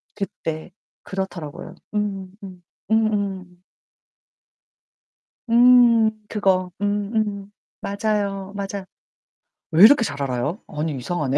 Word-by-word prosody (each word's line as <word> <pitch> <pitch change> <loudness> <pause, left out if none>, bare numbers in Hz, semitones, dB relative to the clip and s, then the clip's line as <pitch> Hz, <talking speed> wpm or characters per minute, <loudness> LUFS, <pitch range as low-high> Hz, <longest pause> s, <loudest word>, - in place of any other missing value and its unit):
그때. 170 -4 -5 0.3
그렇더라고요. 180 -6 -6 0.2
음음음. 195 -2 -5 0.3
음음. 200 -5 0 1.9
음, 235 -2 +6 0.2
그거. 185 -3 +1
음 205 +1 -1
음. 205 -2 -2 0.3
맞아요, 200 -1 -2
맞아. 200 -1 -5 0.9
왜 165 +4 +6
이렇게 240 +2 +8
잘 140 -9 -4
알아요? 140 - -2
아니 150 -1 -3
이상하네. 140 0 -1
195 Hz, 195 characters per minute, -22 LUFS, 175-210 Hz, 1.9 s, 이렇게